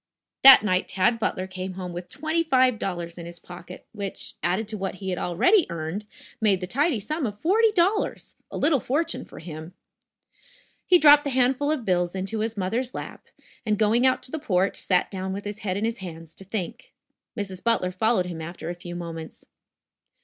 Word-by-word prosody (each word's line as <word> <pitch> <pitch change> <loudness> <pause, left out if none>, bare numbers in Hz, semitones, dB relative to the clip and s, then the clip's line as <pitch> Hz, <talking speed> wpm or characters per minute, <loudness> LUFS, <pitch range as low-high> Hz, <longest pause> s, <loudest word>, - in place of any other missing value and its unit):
That 265 -4 +10
night 185 -3 +1
Tad 195 +5 +1
Butler 185 -4 -1
came 185 0 -6
home 180 -1 -6
with 175 +1 -6
twenty 315 +3 -1
five 255 -6 +3
dollars 175 -2 -4
in 170 - -7
his 170 0 -8
pocket, 180 0 -11
which, 200 -3 -5
added 185 +5 0
to 220 - -4
what 190 -1 -3
he 190 -1 -3
already 190 - +3
had 345 - -2
earned, 170 +5 -4 0.4
made 205 -4 +3
the 180 - -4
tidy 275 - +1
sum 300 +6 -2
of 205 -1 -7
forty 435 +6 +3
dollars 395 +3 0 0.2
a - - -6
little 290 -2 +3
fortune 295 +8 -2
for - - -14
him. 160 +1 -9 1.1
He 360 - +7
dropped 295 -3 +7
the 285 - -2
handful 260 +2 +2
of 300 -7 -1
bills 175 -1 0
into 195 +4 -3
his 220 0 -2
mother's 230 +7 -2
lap, - - -8 0.4
and, 215 -2 0
going 225 +4 +4
out 260 - +1
to 255 - -8
the 315 - -3
porch, 195 -8 0
sat 180 -2 +1
down 190 -1 -4
with 200 +1 -6
his 205 +1 -5
head 190 -3 -2
in 210 - -1
his 230 +1 -2
hands, 165 -3 -9
to 195 - -14
think. 195 -2 -6 0.4
Mrs. 190 -3 -5
Butler 230 -6 +1
followed 190 0 +1
him 170 -2 -6
after 170 0 -6
a - - -4
few 175 0 -9
moments. 165 -2 -8
200 Hz, 200 wpm, -25 LUFS, 180-255 Hz, 1.1 s, That